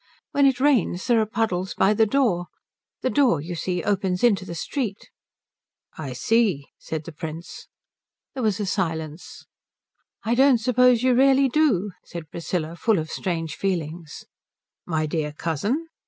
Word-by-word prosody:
"When 280 -1 +4
it 260 -2 +1
rains 255 -10 +2
there 235 -3 +3
are 215 - -1
puddles 190 -4 -1
by 195 +2 +3
the 220 +1 +3
door. 205 -9 +1 0.5
The 255 - 0
door, 260 - +3
you 165 +5 -6
see, 175 0 -2
opens 190 -2 0
into 205 -6 +3
the 170 - -6
street." 215 - -4 0.8
"I 140 -5 -6
see," 190 - +1
said 160 -1 -5
the - - -7
Prince. 160 +2 -8 0.7
There 265 - -4
was 215 -3 +1
a 205 - -1
silence. 160 -4 -4 0.8
"I 225 - 0
don't 265 +1 +5
suppose 250 +1 +3
you 255 -1 +4
really 270 +1 +4
do," 240 - +2
said 165 -3 -9
Priscilla, 170 -1 -3
full 215 +4 +2
of 160 0 -3
strange 165 -4 -3
feelings. 165 -4 -4 0.6
"My 160 -2 0
dear 150 -1 -2
cousin?" 200 - -2
190 Hz, 155 wpm, -24 LUFS, 165-240 Hz, 0.8 s, don't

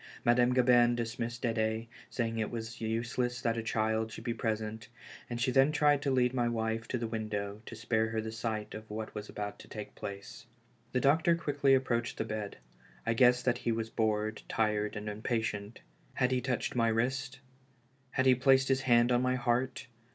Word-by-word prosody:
Madame 120 +1 +4
Gabin 120 -1 +5
dismissed 120 +1 -4
Ded^, 110 -1 0 0.2
saying 115 -2 -2
it 110 - -1
was 115 0 -6
useless 120 +2 -1
that 115 -1 +1
a 115 - -2
child 110 0 0
should - - -8
be 120 -1 -1
present, 110 +1 -3 0.4
and 120 -1 -4
she 130 +2 +1
then 135 +3 +5
tried 145 -1 +3
to 145 - 0
lead 125 -1 +2
my 120 -2 +1
wife 115 0 -2
to 130 - -1
the 120 - -3
window, 105 -2 -3
to - - -7
spare 110 0 0
her 110 0 -2
the 110 0 -4
sight 110 -1 -3
of 110 0 -9
what 110 +1 -5
was 105 0 -6
about 105 0 -5
to - - -12
take 105 -1 -8
place. 100 +3 -8 0.4
The 130 - +1
doctor 160 +5 +4
quickly 145 -4 +2
approached 120 -3 -1
the 110 - -1
bed. 110 -2 -5 0.5
I 115 - +2
guessed 125 +1 +4
that 125 -1 +2
he 120 - -1
was 115 0 -2
bored, 110 -1 0
tired 105 -1 0
and 105 0 -5
impatient. 105 0 -3 0.3
Had 125 -1 +2
he 130 -1 +1
touched 130 -1 -2
my 115 -1 +3
wrist?* 130 +4 -1 0.7
Had 130 0 0
he 130 - +7
placed 130 +1 +4
his 135 0 +2
hand 120 -2 +4
on 120 0 +3
my 125 0 +1
heart? 125 +1 0
115 Hz, 195 wpm, -31 LUFS, 110-125 Hz, 0.7 s, he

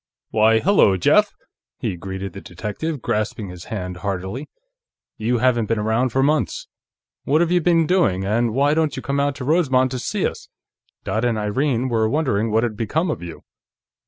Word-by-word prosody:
"Why, 110 +1 +4
hello, 175 - +4
Jeff!" 90 - +4 0.5
he - - -3
greeted 95 +1 -6
the 95 - -8
detective, 115 - -5
grasping 105 -1 -2
his 90 -1 -10
hand 90 -4 -5
heartily. 95 - -4 0.7
"You 120 +3 0
haven't 120 -2 +2
been 115 - 0
around 110 +4 +1
for 135 +3 +1
months. 150 +2 0 0.6
What 150 +3 +2
have 170 0 +2
you 180 0 +3
been 165 -1 +3
doing, 110 - +2
and 115 +3 +1
why 140 +2 +3
don't 155 -3 +1
you - - -6
come 140 0 -1
out 140 0 0
to 130 - -6
Rosemont 135 -5 +2
to 130 - -3
see - - -2
us? - - -4 0.6
Dot 110 - -1
and 120 -2 +1
Irene 120 +4 0
were 110 -3 +1
wondering 120 -6 0
what 110 +2 +2
had 115 -3 -1
become 155 - -1
of - - -5
you." 85 -2 -9
120 Hz, 185 wpm, -21 LUFS, 105-145 Hz, 0.7 s, Why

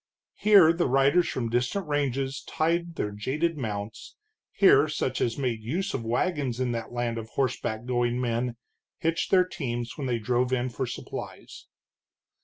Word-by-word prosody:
Here 195 -6 +6
the 170 -2 +1
riders 135 +7 +3
from 120 -3 -2
distant 125 - -1
ranges 135 -2 -1
tied 170 +1 0
their 105 - -2
jaded 145 +11 -1
mounts, 105 -5 -5 0.4
here 190 -5 +5
such 140 -4 -2
as 115 -1 0
made 125 -5 -1
use 175 - -2
of 125 - -3
wagons 130 +1 -1
in 125 -1 0
that 115 -1 -4
land 120 -1 -2
of 110 0 -8
horseback 120 -4 -2
going 120 -1 0
men 120 0 -1 0.4
hitched 165 +1 -1
their 185 -1 +5
teams 120 -7 -4
when 135 - -2
they 120 -2 0
drove 125 +3 0
in 130 0 0
for 130 +2 -3
supplies. - - -8
130 Hz, 160 wpm, -27 LUFS, 120-155 Hz, 0.4 s, Here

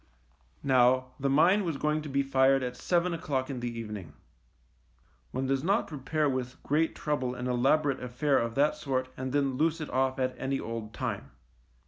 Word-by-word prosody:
Now, 130 -1 +3
the 140 0 0
mine 175 +9 +4
was 165 -5 -2
going 150 +1 0
to 150 - -7
be 140 0 +1
fired 135 0 +3
at 125 0 -3
seven 175 +3 +1
o'clock 140 -5 -2
in 130 - -4
the 120 0 -2
evening. 105 -7 -7 1.2
One 130 +1 -2
does 135 0 0
not 200 +6 +2
pre 150 - -8
pare 150 +3 0
with 130 -2 -2
great 160 +3 +1
trouble 130 -4 -2
an 125 - -5
elaborate 135 +3 +2
affair 135 +3 +1
of 115 -1 -2
that 145 +2 +3
sort 130 -2 -2
and 130 0 -4
then 140 -2 +1
loose 160 +2 +1
it 155 - -5
off 130 +1 +1
at 130 -1 0
any 135 0 -1
old 115 -1 -6
time. - - -3
135 Hz, 185 wpm, -29 LUFS, 125-150 Hz, 1.2 s, mine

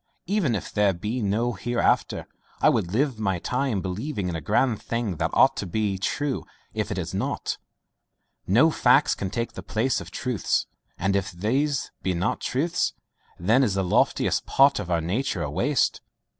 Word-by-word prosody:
Even 180 - +1
if 100 - -5
there 105 -2 +3
be 105 +8 -3
no 110 +4 0
hereafter, 120 +5 0 0.3
I - - +5
would 85 - 0
live 130 +1 0
my 95 -4 0
time 125 +1 -1
believing 100 +2 -3
in 85 - -3
a 80 - -4
grand 115 - +1
thing 115 -7 -2
that - - 0
ought - - +5
to - - -3
be 100 0 -1
true 140 +7 -1 0.3
if - - -2
it - - -3
is - - -4
not. - - -2 0.9
No 125 - +5
facts 135 +1 +4
can 95 - -4
take 115 +4 -2
the - - -7
place 120 +5 0
of - - -9
truths, 125 -7 -1 0.3
and 95 +2 0
if 100 -1 -1
these 135 +11 0
be 95 -1 -1
not 90 +5 -1
truths, 165 +7 0 0.4
then 110 +9 +3
is 105 -7 +2
the 95 - +1
loftiest 90 - +1
part 140 -2 +5
of 95 -4 -5
our 85 -1 +1
nature 95 +1 -1
a 75 - -3
waste. - - +1
110 Hz, 180 wpm, -25 LUFS, 95-130 Hz, 0.9 s, I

